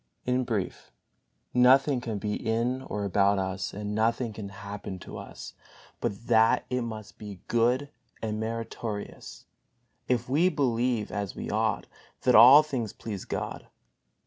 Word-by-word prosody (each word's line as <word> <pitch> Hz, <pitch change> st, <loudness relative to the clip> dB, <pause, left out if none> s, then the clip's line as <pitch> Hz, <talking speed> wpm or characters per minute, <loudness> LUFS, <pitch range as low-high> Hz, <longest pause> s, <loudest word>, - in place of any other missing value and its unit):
In 125 Hz, 0 st, +1 dB
brief, 105 Hz, -6 st, -3 dB, 0.6 s
nothing 130 Hz, +2 st, +5 dB
can 115 Hz, -4 st, -3 dB
be 105 Hz, +1 st, -2 dB
in 120 Hz, +4 st, -1 dB
or 105 Hz, -6 st, -4 dB
about 100 Hz, +1 st, +3 dB
us 95 Hz, -1 st, -2 dB
and 105 Hz, +1 st, -5 dB
nothing 115 Hz, +2 st, 0 dB
can 105 Hz, -2 st, -7 dB
happen 100 Hz, -1 st, -7 dB
to 90 Hz, -, -9 dB
us -, -, -9 dB, 0.5 s
but 105 Hz, +3 st, -3 dB
that 115 Hz, -1 st, +4 dB
it 125 Hz, 0 st, 0 dB
must 110 Hz, -3 st, -7 dB
be 100 Hz, -4 st, -9 dB
good 125 Hz, +5 st, +1 dB, 0.3 s
and 110 Hz, -1 st, -3 dB
meritorious, 110 Hz, -1 st, -5 dB, 0.6 s
if 125 Hz, -1 st, 0 dB
we 155 Hz, +8 st, +3 dB
believe 120 Hz, -, 0 dB
(as 100 Hz, -3 st, -4 dB
we -, -, -5 dB
ought) -, -, 0 dB, 0.4 s
that 125 Hz, -, +4 dB
all 125 Hz, +7 st, +10 dB
things 130 Hz, -8 st, -3 dB
please 105 Hz, -4 st, -6 dB
God. -, -, -5 dB
115 Hz, 145 wpm, -28 LUFS, 105-125 Hz, 0.6 s, all